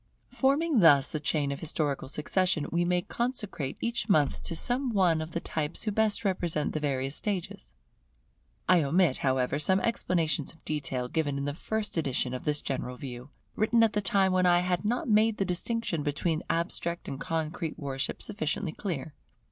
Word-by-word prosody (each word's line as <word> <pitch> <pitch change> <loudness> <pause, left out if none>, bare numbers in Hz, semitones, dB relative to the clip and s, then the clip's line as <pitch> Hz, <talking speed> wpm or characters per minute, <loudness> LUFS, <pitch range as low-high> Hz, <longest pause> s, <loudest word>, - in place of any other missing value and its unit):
Forming 280 +1 +2
thus 145 -7 +6
the 155 - -2
chain 145 -1 0
of 140 - -4
historical 150 -4 -1
succession, 160 +1 +1
we 170 +1 +2
may 180 0 +1
consecrate 210 - -3
each 235 -2 -2
month 150 -7 +3
to 165 - -3
some 250 +9 0
one 180 -7 +3
of 155 - -5
the 170 - -3
types 155 -3 -3
who 215 - 0
best 220 +1 +1
represent 175 -5 0
the 155 - -1
various 135 -1 -1
stages. 195 - -4 0.9
I 180 -2 +5
omit, 155 0 +2
however, 130 +1 0
some 190 +5 +4
explanations 165 -10 0
of 160 - -25
detail 135 -5 -2
given 145 0 -1
in 140 - -2
the 145 - -2
first 215 +5 -3
edition 130 -4 0
of 125 - -5
this 150 -1 0
General 125 -2 -3
View, 125 0 -8 0.3
written 230 +2 +3
at 225 - +3
the 210 - +1
time 195 -1 +2
when 185 0 +3
I 175 0 +5
had 180 -1 0
not 235 +4 -1
made 215 0 +3
the 195 - 0
distinction 180 -1 -1
between 155 +2 -1
the - - -4
abstract 170 0 -2
and 135 - -5
concrete 160 0 -3
worship 135 -3 -3
sufficiently 185 -3 -2
clear. 160 -5 -4
165 Hz, 180 wpm, -29 LUFS, 145-200 Hz, 0.9 s, thus